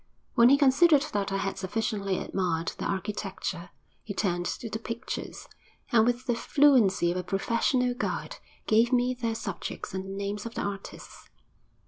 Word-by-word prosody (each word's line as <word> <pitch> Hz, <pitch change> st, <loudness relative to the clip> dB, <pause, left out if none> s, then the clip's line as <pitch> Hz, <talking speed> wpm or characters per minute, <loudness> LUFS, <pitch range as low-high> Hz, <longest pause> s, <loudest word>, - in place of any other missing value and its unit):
When 235 Hz, +1 st, +6 dB
he 280 Hz, -, +6 dB
considered 285 Hz, +2 st, +5 dB
that 200 Hz, -1 st, -1 dB
I 195 Hz, -, 0 dB
had 195 Hz, -1 st, -3 dB
sufficiently 200 Hz, -1 st, -1 dB
admired 175 Hz, -3 st, -1 dB
the -, -, -3 dB
architecture, 190 Hz, -3 st, -3 dB, 0.3 s
he 200 Hz, -, -6 dB
turned 175 Hz, -3 st, 0 dB
to 235 Hz, -, -4 dB
the 220 Hz, 0 st, -4 dB
pictures, 230 Hz, 0 st, -6 dB, 0.4 s
and, 225 Hz, -1 st, +5 dB
with 245 Hz, +1 st, 0 dB
the 245 Hz, -, +1 dB
fluency 230 Hz, -9 st, +4 dB
of 180 Hz, -, -2 dB
a 180 Hz, -, -2 dB
professional 235 Hz, +6 st, +1 dB
guide, 245 Hz, -, -3 dB, 0.3 s
gave 230 Hz, +2 st, +3 dB
me 250 Hz, 0 st, +2 dB
their 230 Hz, -2 st, -2 dB
subjects 195 Hz, -5 st, -5 dB
and 190 Hz, 0 st, -3 dB
the -, -, -8 dB
names 205 Hz, +2 st, -3 dB
of 230 Hz, -, -10 dB
the -, -, -2 dB
artists. 200 Hz, -1 st, -7 dB
215 Hz, 165 wpm, -28 LUFS, 195-245 Hz, 0.4 s, When